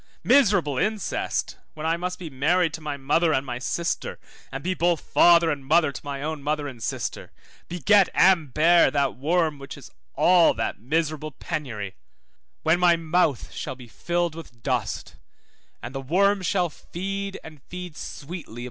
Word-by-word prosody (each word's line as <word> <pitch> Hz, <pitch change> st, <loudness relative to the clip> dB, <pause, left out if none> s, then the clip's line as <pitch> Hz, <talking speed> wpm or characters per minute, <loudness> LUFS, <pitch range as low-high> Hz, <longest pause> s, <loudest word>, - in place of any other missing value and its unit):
Miserable 195 Hz, -, +3 dB
incest, 215 Hz, -3 st, -2 dB, 0.2 s
when 155 Hz, 0 st, -6 dB
I 165 Hz, +1 st, +2 dB
must 180 Hz, +1 st, -4 dB
be 175 Hz, -, -7 dB
married 160 Hz, +5 st, +1 dB
to 160 Hz, -, -6 dB
my 150 Hz, -2 st, -4 dB
mother 155 Hz, +5 st, +2 dB
and 130 Hz, +1 st, -1 dB
my 125 Hz, -2 st, -4 dB
sister, 170 Hz, +6 st, -2 dB, 0.3 s
and 135 Hz, +1 st, -6 dB
be 185 Hz, +2 st, 0 dB
both 175 Hz, -2 st, +1 dB
father 170 Hz, -1 st, +5 dB
and 140 Hz, -2 st, -4 dB
mother 155 Hz, +2 st, +3 dB
to -, -, -8 dB
my 140 Hz, -1 st, -5 dB
own 155 Hz, -1 st, -3 dB
mother 150 Hz, 0 st, -1 dB
and 125 Hz, -5 st, -9 dB
sister, -, -, -4 dB, 0.4 s
beget 195 Hz, +3 st, +3 dB
and 170 Hz, -7 st, +4 dB
bear 170 Hz, +5 st, +5 dB
that 140 Hz, -3 st, 0 dB
worm 155 Hz, +2 st, 0 dB
which 140 Hz, -, -9 dB
is -, -, -13 dB, 0.2 s
all 175 Hz, -2 st, +5 dB
that 115 Hz, -, -3 dB
miserable 155 Hz, +4 st, -1 dB
penury; 120 Hz, -, -5 dB, 0.7 s
when 160 Hz, +2 st, +3 dB
my 175 Hz, -1 st, +5 dB
mouth 165 Hz, -4 st, 0 dB
shall 135 Hz, -, -5 dB
be 125 Hz, -1 st, -13 dB
filled 175 Hz, +7 st, -2 dB
with 120 Hz, -8 st, -12 dB
dust, 125 Hz, -5 st, -2 dB, 0.7 s
and 120 Hz, -, -6 dB
the 135 Hz, -, -4 dB
worm 195 Hz, +8 st, +2 dB
shall 180 Hz, -1 st, 0 dB
feed, 195 Hz, +5 st, -5 dB
and 155 Hz, -3 st, -12 dB
feed 180 Hz, +1 st, -8 dB
sweetly 170 Hz, +6 st, -7 dB
2222 -, -, -20 dB
Job -, -, -10 dB
24:20. -, -, -6 dB
160 Hz, 175 wpm, -25 LUFS, 140-175 Hz, 0.7 s, father